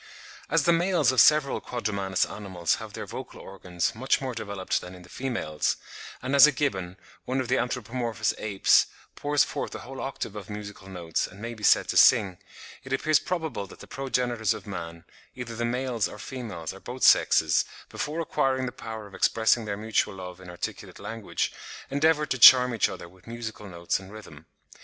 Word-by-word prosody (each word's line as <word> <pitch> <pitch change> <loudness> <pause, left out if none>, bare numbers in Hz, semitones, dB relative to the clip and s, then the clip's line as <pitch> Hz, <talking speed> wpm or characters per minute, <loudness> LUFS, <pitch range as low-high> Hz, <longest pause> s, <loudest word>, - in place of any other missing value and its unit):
As - - +3
the 170 - +4
males 170 -6 +3
of 130 -3 +5
several 150 -2 +4
quadrumanous 100 -5 -1
animals 95 -5 -2
have - - -9
their - - -6
vocal - - -8
organs 90 -3 -3
much 130 +4 +1
more 130 -2 -4
developed 100 -4 -3
than 90 +1 -10
in 90 - -13
the 90 - -16
females, 115 - -2 0.5
and 130 +2 0
as 140 +1 +10
a - - +3
gibbon, 95 - -2 0.3
one 130 +1 -1
of 130 -2 -3
the - - +2
anthropomorphous 120 -2 -2
apes, 100 -3 +3 0.3
pours 145 0 +2
forth - - -4
a - - -5
whole 135 +1 -7
octave 135 -6 -5
of 105 -2 -8
musical 105 -2 -8
notes 85 -3 -2
and 95 - -14
may 115 +2 -5
be 110 -2 -12
said - - +5
to - - 0
sing, 95 -3 +5 0.4
it 135 - -10
appears 155 +3 +3
probable 160 - -3
that - - -14
the - - -10
progenitors 125 -5 -1
of - - -10
man, 85 -4 -7 0.3
either 120 -2 -6
the 120 +1 -1
males 125 -2 -1
or - - -10
females 105 -9 -6
or 95 - -12
both 125 +5 -7
sexes, 80 -1 +5 0.3
before 155 +3 -3
acquiring 130 -4 0
the 125 - -3
power 110 -3 -8
of 100 - -14
expressing 110 +3 +2
their 100 -1 -3
mutual 105 -1 0
love 90 -1 -9
in 90 - -11
articulate 90 - -6
language, 110 +1 -3 0.4
endeavoured 150 +2 +2
to 130 - 0
charm 125 +1 +9
each 115 - +2
other - - -8
with 90 +3 -21
musical 115 -2 -7
notes 85 -1 -2
and 95 0 -12
rhythm. 80 -8 -12
110 Hz, 190 wpm, -27 LUFS, 95-130 Hz, 0.5 s, as